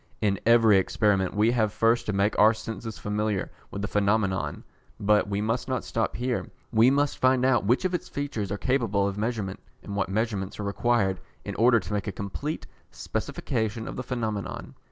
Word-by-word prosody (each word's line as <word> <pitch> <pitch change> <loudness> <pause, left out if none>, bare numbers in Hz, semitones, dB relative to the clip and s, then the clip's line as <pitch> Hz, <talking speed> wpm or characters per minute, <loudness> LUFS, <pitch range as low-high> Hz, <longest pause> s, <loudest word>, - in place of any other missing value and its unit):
In 100 -2 +1
every 115 -4 +6
experiment 95 -1 +1
we 105 +3 +4
have 110 -4 +1
first 115 +2 +2
to - - +1
make 100 +1 +1
our 110 +2 +6
senses 110 0 -6
familiar 105 -1 -2 0.2
with 100 - -5
the - - -1
phenomenon, 100 -1 0 0.4
but 105 0 +3
we 100 0 -1
must 115 +4 -1
not 130 -1 -1
stop 115 - -2
here, 125 0 -2 0.2
we 115 +1 +5
must 145 +1 +1
find 130 0 +3
out 125 -6 +3
which 125 - +2
of 185 - 0
its 175 - -3
features 125 -9 -3
are 100 - -1
capable 110 -6 +1
of 100 - -3
measurement, 110 -4 -2 0.2
and 100 - -6
what 95 -1 0
measurements 100 -2 -2
are - - -2
required 100 -1 +1 0.3
in - - -4
order 115 +1 +4
to 100 +1 -6
make 105 +1 -2
a - - -1
complete 100 +11 -4 0.2
specification 110 +1 -3
of - - -5
the - - -3
phenomenon. 110 -5 -4
110 Hz, 190 wpm, -27 LUFS, 100-120 Hz, 0.4 s, every